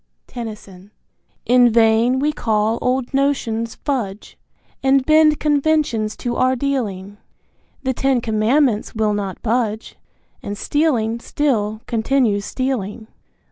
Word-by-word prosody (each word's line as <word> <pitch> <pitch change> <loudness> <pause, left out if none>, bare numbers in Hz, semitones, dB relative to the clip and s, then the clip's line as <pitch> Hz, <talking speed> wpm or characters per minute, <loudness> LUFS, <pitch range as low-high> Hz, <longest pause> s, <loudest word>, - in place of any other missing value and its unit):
Tennyson. 210 -5 -9 0.6
In 245 0 +5
vain 230 +2 +3
we 295 +3 0
call 220 -2 0
old 255 +1 -1
notions 230 -5 -1
fudge, 220 -8 -4 0.5
And 270 0 +3
bend 310 0 +4
conventions 290 -7 +1
to 240 -1 -3
our 255 0 +2
dealing, 210 -7 -3 0.6
The 260 -1 0
Ten 265 0 +1
Commandments 225 +2 +1
will 215 -1 +1
not 200 -2 -4
budge, 225 -1 -2 0.4
And 205 0 -6
stealing 235 -6 0
still 220 -6 -1
continues 225 -3 0
stealing. 230 -4 -3
235 Hz, 110 wpm, -19 LUFS, 215-270 Hz, 0.6 s, In